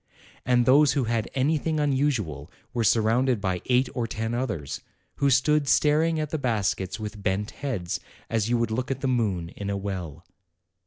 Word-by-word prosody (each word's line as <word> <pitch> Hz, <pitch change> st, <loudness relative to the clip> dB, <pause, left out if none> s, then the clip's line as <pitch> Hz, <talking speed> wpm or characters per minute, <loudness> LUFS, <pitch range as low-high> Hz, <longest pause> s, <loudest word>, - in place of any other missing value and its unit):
And 120 Hz, -1 st, +4 dB
those 140 Hz, +2 st, +5 dB
who 140 Hz, -2 st, +1 dB
had 115 Hz, -1 st, -1 dB
anything 155 Hz, +3 st, +1 dB
unusual 130 Hz, -, 0 dB, 0.2 s
were 120 Hz, -, 0 dB
surrounded 115 Hz, +3 st, +3 dB
by 95 Hz, -3 st, -1 dB
eight 125 Hz, +1 st, +3 dB
or 120 Hz, -2 st, -2 dB
ten 110 Hz, +1 st, -3 dB
others, 105 Hz, -, -3 dB, 0.4 s
who 140 Hz, -, +3 dB
stood 145 Hz, +3 st, +3 dB
staring 155 Hz, +3 st, +3 dB
at 155 Hz, -1 st, -3 dB
the 155 Hz, -, -1 dB
baskets 105 Hz, -5 st, -1 dB
with 105 Hz, -1 st, -6 dB
bent 100 Hz, +2 st, -1 dB
heads, 110 Hz, -12 st, -3 dB, 0.3 s
as 110 Hz, -1 st, 0 dB
you 120 Hz, -, +2 dB
would 115 Hz, -1 st, 0 dB
look 125 Hz, +3 st, -2 dB
at 135 Hz, -1 st, -3 dB
the 135 Hz, -, 0 dB
moon 105 Hz, -9 st, 0 dB
in 100 Hz, +2 st, -6 dB
a 100 Hz, -, -1 dB
well. 90 Hz, -5 st, -5 dB
115 Hz, 175 wpm, -26 LUFS, 100-135 Hz, 0.4 s, those